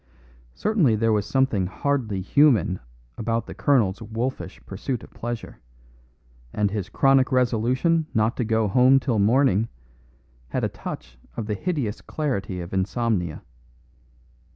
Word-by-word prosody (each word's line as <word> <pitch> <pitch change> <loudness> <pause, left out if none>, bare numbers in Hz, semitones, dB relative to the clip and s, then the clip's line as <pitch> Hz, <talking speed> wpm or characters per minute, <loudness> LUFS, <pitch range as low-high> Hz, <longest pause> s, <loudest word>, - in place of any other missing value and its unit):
Certainly 165 - +2
there 110 +1 +2
was 105 -2 0
something 130 -9 +1
hardly 110 -3 -1
human 110 -4 +3 0.4
about 115 0 -1
the - - -8
colonel's 115 -9 +2
wolfish 115 +4 -4
pursuit 110 +5 -4
of - - -13
pleasure, 120 0 -6 0.9
and 105 +3 0
his 100 -3 -3
chronic 135 +4 +3
resolution 130 +6 +2
not 110 +2 +1
to 125 - 0
go 110 -1 +1
home 130 +6 +5
till 125 -5 0
morning 110 0 +3 0.8
had - - -2
a - - +1
touch 65 0 -8 0.2
of 115 - -2
the 105 - -2
hideous 135 - -2
clarity 100 - -3
of 85 +2 -8
insomnia. 95 -3 -1
115 Hz, 130 wpm, -24 LUFS, 100-130 Hz, 0.9 s, home